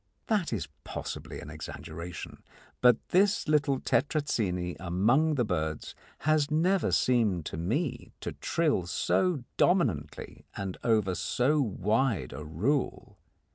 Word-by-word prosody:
That 205 Hz, -7 st, 0 dB
is 110 Hz, -7 st, -2 dB, 0.2 s
possibly -, -, -6 dB
an -, -, -9 dB
exaggeration, 85 Hz, +1 st, -7 dB, 0.4 s
but 125 Hz, -2 st, +4 dB
this 200 Hz, +3 st, +3 dB
little 145 Hz, -3 st, +2 dB
Tetrazzini 105 Hz, -, 0 dB
among 115 Hz, -, +2 dB
the 125 Hz, -4 st, +1 dB
birds 80 Hz, -5 st, -2 dB, 0.3 s
has 155 Hz, 0 st, +2 dB
never 180 Hz, +5 st, +2 dB
seemed 110 Hz, -10 st, +2 dB
to -, -, -5 dB
me 115 Hz, -, -2 dB
to -, -, -3 dB
trill 150 Hz, -, 0 dB
so 175 Hz, -, +1 dB
dominantly 75 Hz, -, 0 dB
and 95 Hz, -2 st, -3 dB
over 110 Hz, -5 st, +2 dB
so 140 Hz, +10 st, +1 dB
wide 110 Hz, -, 0 dB
a 75 Hz, +4 st, -6 dB
rule. 100 Hz, -, -2 dB
120 Hz, 120 wpm, -29 LUFS, 90-150 Hz, 0.4 s, but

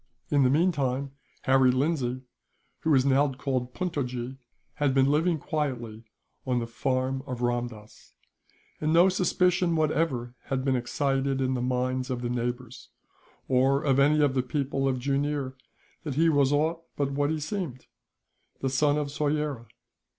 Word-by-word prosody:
In 145 Hz, -1 st, +4 dB
the 130 Hz, -, +4 dB
meantime 140 Hz, -4 st, +1 dB, 0.3 s
Harry 130 Hz, -1 st, +4 dB
Lindsay, 130 Hz, -1 st, 0 dB, 0.6 s
who 160 Hz, -, -2 dB
was 135 Hz, -4 st, +4 dB
now 140 Hz, +1 st, +3 dB
called 130 Hz, -1 st, -3 dB
Puntojee, 130 Hz, -8 st, -3 dB, 0.4 s
had 145 Hz, -3 st, +1 dB
been 135 Hz, -1 st, +5 dB
living 160 Hz, +4 st, +2 dB
quietly 120 Hz, -8 st, -3 dB, 0.4 s
on 125 Hz, -2 st, 0 dB
the 120 Hz, -, -1 dB
farm 130 Hz, +2 st, -1 dB
of 125 Hz, -2 st, -4 dB
Ramdass; 120 Hz, -3 st, -4 dB, 0.7 s
and 155 Hz, +1 st, 0 dB
no 175 Hz, +3 st, +6 dB
suspicion 180 Hz, -1 st, +2 dB
whatever 150 Hz, -6 st, 0 dB
had 135 Hz, -1 st, -2 dB
been 135 Hz, -1 st, +2 dB
excited 135 Hz, +2 st, 0 dB
in 130 Hz, 0 st, +1 dB
the 125 Hz, -, -1 dB
minds 130 Hz, +1 st, -1 dB
of 125 Hz, -1 st, -3 dB
the 120 Hz, -, -2 dB
neighbours, 125 Hz, 0 st, -4 dB, 0.6 s
or 135 Hz, +2 st, +3 dB
of 135 Hz, -2 st, +2 dB
any 150 Hz, +2 st, +4 dB
of 145 Hz, -3 st, +3 dB
the 130 Hz, -, +2 dB
people 135 Hz, +1 st, -1 dB
of 130 Hz, -1 st, +1 dB
Jooneer, 140 Hz, +1 st, -1 dB, 0.5 s
that 145 Hz, -5 st, -4 dB
he 165 Hz, +3 st, +4 dB
was 140 Hz, -3 st, +3 dB
aught 160 Hz, +3 st, +1 dB
but 140 Hz, -1 st, -1 dB
what 145 Hz, +1 st, 0 dB
he 160 Hz, 0 st, -1 dB
seemed 155 Hz, -, -4 dB, 0.7 s
the 135 Hz, -, -1 dB
son 145 Hz, +2 st, +2 dB
of 145 Hz, -1 st, -2 dB
Soyera. 145 Hz, -4 st, -1 dB
135 Hz, 155 wpm, -27 LUFS, 125-150 Hz, 0.7 s, no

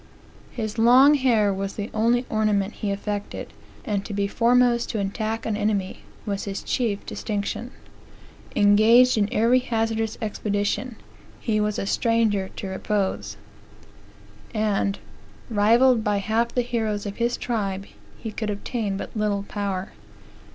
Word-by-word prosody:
"His 220 Hz, -1 st, -4 dB
long 255 Hz, +5 st, +7 dB
hair 235 Hz, -8 st, +3 dB
was 195 Hz, 0 st, -4 dB
the 205 Hz, 0 st, -5 dB
only 235 Hz, +3 st, +2 dB
ornament 215 Hz, -2 st, +1 dB
he 210 Hz, -, -4 dB
affected, 205 Hz, +1 st, -4 dB, 0.3 s
and 205 Hz, -2 st, -1 dB
to 205 Hz, -, -6 dB
be 200 Hz, 0 st, +1 dB
foremost 240 Hz, +2 st, +3 dB
to 220 Hz, -, -2 dB
attack 215 Hz, +3 st, -2 dB
an 220 Hz, -, -1 dB
enemy 205 Hz, -2 st, -1 dB, 0.3 s
was 200 Hz, -1 st, -3 dB
his 200 Hz, -1 st, -4 dB
chief 220 Hz, -6 st, -1 dB
distinction. 210 Hz, +3 st, -3 dB, 0.9 s
Engaged 220 Hz, +5 st, +6 dB
in 210 Hz, -1 st, +1 dB
every 235 Hz, +4 st, +4 dB
hazardous 225 Hz, -2 st, -1 dB
expedition, 210 Hz, +3 st, -2 dB, 0.4 s
he 215 Hz, -2 st, 0 dB
was 210 Hz, 0 st, 0 dB
a -, -, -2 dB
stranger 215 Hz, -3 st, +1 dB
to 195 Hz, -, -5 dB
repose; 195 Hz, +1 st, -2 dB, 1.2 s
and, 205 Hz, -2 st, 0 dB, 0.5 s
rivalled 230 Hz, +3 st, +4 dB
by 210 Hz, -1 st, +1 dB
half 220 Hz, +4 st, +1 dB
the 245 Hz, +1 st, 0 dB
heroes 220 Hz, -4 st, -2 dB
of 200 Hz, -1 st, -5 dB
his 235 Hz, +1 st, 0 dB
tribe, 200 Hz, -5 st, -2 dB, 0.3 s
he 225 Hz, -, -6 dB
could 215 Hz, 0 st, -4 dB
obtain 205 Hz, -1 st, -3 dB
little 210 Hz, -2 st, 0 dB
power. 200 Hz, -2 st, -4 dB
215 Hz, 135 wpm, -24 LUFS, 200-230 Hz, 1.2 s, long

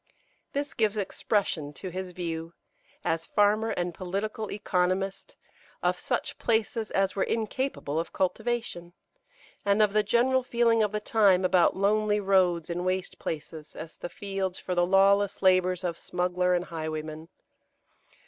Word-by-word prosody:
This 285 Hz, +1 st, -2 dB
gives 215 Hz, -2 st, +1 dB
expression 190 Hz, -6 st, -1 dB
to 185 Hz, -, -7 dB
his 185 Hz, +1 st, -5 dB
view, 165 Hz, -1 st, -5 dB, 0.5 s
as 165 Hz, 0 st, -1 dB
farmer 210 Hz, +2 st, +3 dB
and 175 Hz, -4 st, -2 dB
political 200 Hz, +4 st, -4 dB
economist, 190 Hz, -1 st, -1 dB, 0.5 s
of -, -, +1 dB
such -, -, -2 dB
places 225 Hz, -1 st, 0 dB
as 195 Hz, 0 st, +1 dB
were 195 Hz, -, -1 dB
incapable 225 Hz, -, -1 dB
of 165 Hz, -, -4 dB
cultivation, 190 Hz, -2 st, -2 dB, 0.7 s
and 200 Hz, +1 st, +2 dB
of 210 Hz, -2 st, +4 dB
the 215 Hz, -, +4 dB
general 245 Hz, +5 st, +2 dB
feeling 235 Hz, -2 st, +2 dB
of 210 Hz, -2 st, +1 dB
the 210 Hz, -, -1 dB
time 200 Hz, -4 st, +3 dB
about 180 Hz, -1 st, +4 dB
lonely 210 Hz, +1 st, +2 dB
roads 185 Hz, -4 st, +2 dB
in 175 Hz, +1 st, -3 dB
waste 185 Hz, 0 st, -2 dB
places, 155 Hz, 0 st, -6 dB
as 160 Hz, +1 st, -8 dB
the 175 Hz, -, -6 dB
fields 195 Hz, -2 st, -3 dB
for 185 Hz, -, -4 dB
the 175 Hz, 0 st, +2 dB
lawless 195 Hz, +1 st, +3 dB
labours 185 Hz, -1 st, +3 dB
of 170 Hz, -2 st, -2 dB
smuggler 180 Hz, 0 st, 0 dB
and 175 Hz, 0 st, -1 dB
highwayman. 155 Hz, 0 st, -5 dB
190 Hz, 145 wpm, -28 LUFS, 175-210 Hz, 0.7 s, of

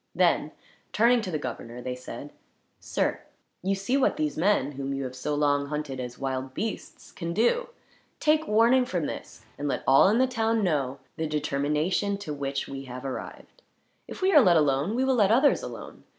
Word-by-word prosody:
Then, -, -, +2 dB, 0.4 s
turning 235 Hz, +2 st, +4 dB
to 195 Hz, -, -5 dB
the 160 Hz, -, -1 dB
governor 120 Hz, -3 st, -6 dB
they 125 Hz, +1 st, -4 dB
said: 125 Hz, +2 st, -9 dB, 0.5 s
"Sir, -, -, -1 dB, 0.4 s
you 195 Hz, +2 st, 0 dB
see 200 Hz, +8 st, 0 dB
what 275 Hz, -, +2 dB
these 150 Hz, -1 st, -1 dB
men, 165 Hz, -5 st, +2 dB
whom 140 Hz, 0 st, -4 dB
you 135 Hz, -, -3 dB
have 130 Hz, -1 st, -6 dB
so 145 Hz, +3 st, -2 dB
long 145 Hz, -1 st, +1 dB
hunted 150 Hz, -3 st, -4 dB
as 125 Hz, -1 st, -6 dB
wild 130 Hz, -1 st, -4 dB
beasts, 220 Hz, -1 st, -5 dB
can 170 Hz, -1 st, -5 dB
do. 240 Hz, -, +2 dB, 0.5 s
Take 310 Hz, +1 st, +2 dB
warning 230 Hz, +4 st, +4 dB
from 175 Hz, -9 st, -1 dB
this, -, -, -7 dB
and 145 Hz, -, -2 dB
let 140 Hz, -, -2 dB
all 135 Hz, +6 st, +6 dB
in 215 Hz, -, +3 dB
the 260 Hz, -, +4 dB
town 225 Hz, -3 st, 0 dB
know 140 Hz, -7 st, 0 dB, 0.2 s
the 160 Hz, -, -1 dB
determination 150 Hz, +6 st, 0 dB
to 195 Hz, -7 st, -6 dB
which 140 Hz, -1 st, -3 dB
we 135 Hz, 0 st, -7 dB
have 125 Hz, +1 st, -8 dB
arrived. 135 Hz, -, -7 dB, 0.5 s
If -, -, -8 dB
we 385 Hz, +1 st, +3 dB
are 295 Hz, -, +9 dB
let 180 Hz, -7 st, +5 dB
alone, 145 Hz, +6 st, +1 dB
we 260 Hz, +2 st, +1 dB
will 265 Hz, -, +3 dB
let 210 Hz, -5 st, +3 dB
others 270 Hz, +5 st, +4 dB
alone. -, -, -9 dB
150 Hz, 195 wpm, -27 LUFS, 135-220 Hz, 0.5 s, are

